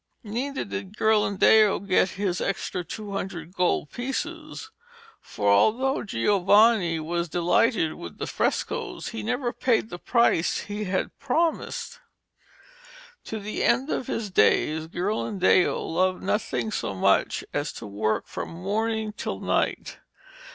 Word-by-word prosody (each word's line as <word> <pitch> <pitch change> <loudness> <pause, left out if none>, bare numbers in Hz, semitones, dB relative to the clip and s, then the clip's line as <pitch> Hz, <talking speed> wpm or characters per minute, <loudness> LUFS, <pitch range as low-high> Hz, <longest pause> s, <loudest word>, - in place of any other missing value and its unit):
Neither 255 +6 -3
did 200 0 -6
Ghirlandaio 215 -1 +4
get 185 0 +3
his 190 -3 -1
extra 185 -1 -2
two 205 +4 -7
hundred 185 -4 -5
gold 180 -5 0
pieces, 310 - -5 0.5
for 100 - -4
although 250 - +3
Giovanni 195 - +3
was 170 +2 -2
delighted 175 +1 +2
with 85 -2 -9
the - - -3
frescoes - - -2
he 110 - -5
never 240 - -2
paid 230 -3 +1
the 175 - -6
price 235 -8 +2
he 210 +1 -5
had 185 0 -2
promised. 330 - -1 1.3
To 220 - -4
the 210 +1 -4
end 255 +5 +2
of 250 - -2
his 215 -3 -3
days 155 - +2
Ghirlandaio 185 +1 +1
loved 185 +2 0
nothing 220 +1 -1
so 100 - -3
much 95 - +2
as 145 +1 -1
to 115 - -8
work 105 +1 -1
from - - -6
morning 215 +5 -2
till 95 - -4
night. - - -1
200 Hz, 130 wpm, -25 LUFS, 175-225 Hz, 1.3 s, Ghirlandaio